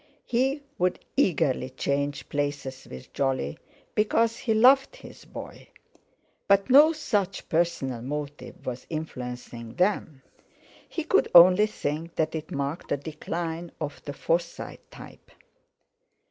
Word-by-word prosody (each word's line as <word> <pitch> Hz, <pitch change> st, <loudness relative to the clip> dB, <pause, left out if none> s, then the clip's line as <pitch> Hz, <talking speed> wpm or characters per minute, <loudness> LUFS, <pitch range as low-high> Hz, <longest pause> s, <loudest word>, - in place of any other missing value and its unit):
He 270 Hz, +4 st, 0 dB, 0.2 s
would 180 Hz, 0 st, +2 dB, 0.2 s
eagerly 130 Hz, -6 st, +2 dB
change 140 Hz, +2 st, -2 dB
places 145 Hz, -2 st, -3 dB
with 65 Hz, 0 st, -11 dB
Jolly, 135 Hz, -, -1 dB, 0.3 s
because 225 Hz, +2 st, +2 dB
he 225 Hz, -2 st, -1 dB
loved 265 Hz, -, +5 dB
his -, -, -13 dB
boy; -, -, -10 dB, 0.8 s
but 200 Hz, +3 st, +3 dB
no 295 Hz, +4 st, +8 dB
such 205 Hz, -, -2 dB
personal 150 Hz, -8 st, 0 dB
motive 145 Hz, +3 st, -6 dB
was 125 Hz, 0 st, -5 dB
influencing 125 Hz, -6 st, -6 dB
them. 175 Hz, -7 st, 0 dB, 0.7 s
He 330 Hz, -, -3 dB
could 385 Hz, +6 st, +2 dB
only 180 Hz, +4 st, +9 dB
think 165 Hz, -4 st, -4 dB
that 160 Hz, -, 0 dB
it 160 Hz, -1 st, -5 dB
marked 140 Hz, +4 st, -3 dB
the -, -, 0 dB
decline 165 Hz, +3 st, -5 dB
of 145 Hz, -2 st, -5 dB
the 145 Hz, -, -5 dB
Forsyte 170 Hz, +4 st, -3 dB
type. -, -, -13 dB
160 Hz, 120 wpm, -27 LUFS, 140-205 Hz, 0.8 s, only